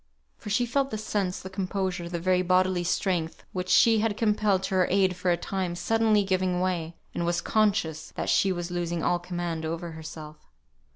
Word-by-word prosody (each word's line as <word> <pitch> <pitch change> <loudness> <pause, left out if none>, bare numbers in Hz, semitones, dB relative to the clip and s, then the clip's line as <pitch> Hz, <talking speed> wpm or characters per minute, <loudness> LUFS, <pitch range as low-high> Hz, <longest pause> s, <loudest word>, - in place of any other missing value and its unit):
For - - -8
she 215 +4 +2
felt 270 +3 0
the 215 - -3
sense, 200 -3 -2
the 190 - -7
composure, 185 -2 -2
the 170 -1 -3
very 185 +1 +2
bodily 185 0 +2
strength 175 -2 -1
which 185 0 -3
she 225 +2 +5
had 215 -1 0
compelled 210 -3 +2
to - - -2
her 185 -1 +3
aid 190 -1 +3
for 180 0 -1
a 175 - +3
time, 185 -2 -3
suddenly 220 +3 +2
giving 185 -2 0
way, 175 -3 -1 0.2
and - - -2
was 170 0 +1
conscious 200 -6 0
that - - -3
she 195 - +3
was 175 -1 -3
losing 175 -1 -2
all 175 - +2
command 175 -2 -4
over 165 +1 -4
herself. 155 -1 -9
185 Hz, 190 wpm, -27 LUFS, 175-200 Hz, 0.2 s, she